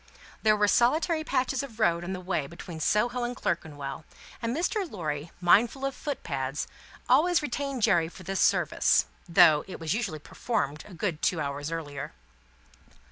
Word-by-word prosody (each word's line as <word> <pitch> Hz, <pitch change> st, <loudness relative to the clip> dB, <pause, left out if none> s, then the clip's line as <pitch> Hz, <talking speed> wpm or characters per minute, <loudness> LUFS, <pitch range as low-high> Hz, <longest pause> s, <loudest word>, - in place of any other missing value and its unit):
There 215 Hz, -1 st, +4 dB
were 205 Hz, 0 st, +3 dB
solitary 315 Hz, -, +3 dB
patches 265 Hz, -2 st, 0 dB
of 240 Hz, -5 st, -9 dB
road 170 Hz, -5 st, +2 dB
on 175 Hz, -, -4 dB
the 190 Hz, -, -3 dB
way 175 Hz, -6 st, -2 dB
between 170 Hz, +1 st, -9 dB
Soho 240 Hz, +9 st, +1 dB
and 240 Hz, +1 st, -2 dB
Clerkenwell, 145 Hz, -, -3 dB, 0.4 s
and 235 Hz, +3 st, -1 dB
Mr. 365 Hz, +2 st, -1 dB
Lorry, 155 Hz, -, -4 dB
mindful 230 Hz, +9 st, +4 dB
of 275 Hz, -, -1 dB
foot 290 Hz, 0 st, -5 dB
pads, 135 Hz, -1 st, -3 dB, 0.4 s
always 350 Hz, 0 st, +4 dB
retained 275 Hz, -2 st, -3 dB
Jerry 175 Hz, -7 st, +3 dB
for 185 Hz, -, -13 dB
this 195 Hz, +2 st, -3 dB
service: -, -, +3 dB, 0.2 s
though 170 Hz, -4 st, +6 dB
it 190 Hz, -, -8 dB
was 160 Hz, -1 st, -1 dB
usually 210 Hz, -8 st, -2 dB
performed 150 Hz, -, -3 dB
a 195 Hz, -, -11 dB
good 170 Hz, -3 st, -2 dB
two 175 Hz, -, +1 dB
hours 145 Hz, 0 st, -3 dB
earlier. 145 Hz, -, -5 dB
185 Hz, 165 wpm, -28 LUFS, 160-245 Hz, 0.4 s, though